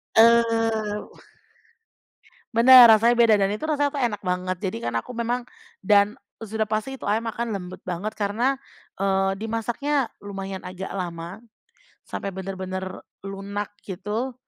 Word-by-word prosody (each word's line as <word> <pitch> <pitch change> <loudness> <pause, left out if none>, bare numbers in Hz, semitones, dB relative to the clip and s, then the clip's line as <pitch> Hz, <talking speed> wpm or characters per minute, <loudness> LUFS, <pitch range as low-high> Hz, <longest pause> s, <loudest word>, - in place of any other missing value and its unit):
Eee, 225 -2 +4 1.6
bener, 245 +2 +9
rasanya 230 +3 +4
beda 230 -2 +6
dan 195 - +3
itu 210 +9 -4
rasanya 290 -2 +1
tuh 275 - -1
enak 205 -4 -1
banget, 185 0 -2
jadi 190 - -3
kan 120 - -4
aku 245 - -10
memang 240 +1 -2 0.3
dan 205 +1 +4 0.2
sudah 220 -1 -3
pasti 220 +5 -3
itu - - -4
ayam 220 +3 +1
akan 230 -3 -3
lembut 180 -1 -8
banget 185 +5 -3
karena, 230 +7 0 0.4
eee, 195 0 +2
dimasaknya 240 +5 -1
lumayan 195 -1 -6
agak 185 +1 -7
lama 175 0 -5 0.6
sampai 195 -2 -6
bener-bener 190 0 -5 0.4
lunak 195 +1 -5 0.2
gitu 210 +7 -3
210 Hz, 135 wpm, -24 LUFS, 195-235 Hz, 1.6 s, bener